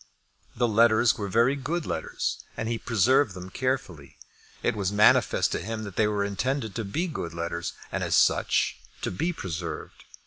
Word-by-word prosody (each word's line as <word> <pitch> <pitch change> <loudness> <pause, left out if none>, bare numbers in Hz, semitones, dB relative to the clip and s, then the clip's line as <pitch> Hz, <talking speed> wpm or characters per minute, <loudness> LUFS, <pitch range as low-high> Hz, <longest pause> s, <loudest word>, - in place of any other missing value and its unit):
The 120 - +2
letters 110 -1 +4
were 100 +1 -4
very 115 +7 +3
good 155 +5 -3
letters, - - -3
and 115 - -2
he 115 0 -1
preserved 120 0 +2
them 90 0 -8
carefully. 125 - -3 0.5
It 120 - +1
was 100 -2 -1
manifest 105 +1 +4
to - - -1
him 110 +3 -4
that 100 -3 -8
they 110 - +3
were 105 -1 0
intended 110 +2 -2
to 115 - -3
be 145 - -2
good 85 - -5
letters, 85 0 -3 0.2
and, - - -2
as - - +1
such, - - +3 0.3
to - - -1
be 165 - -1
preserved. 90 - -6
110 Hz, 175 wpm, -27 LUFS, 95-130 Hz, 0.5 s, letters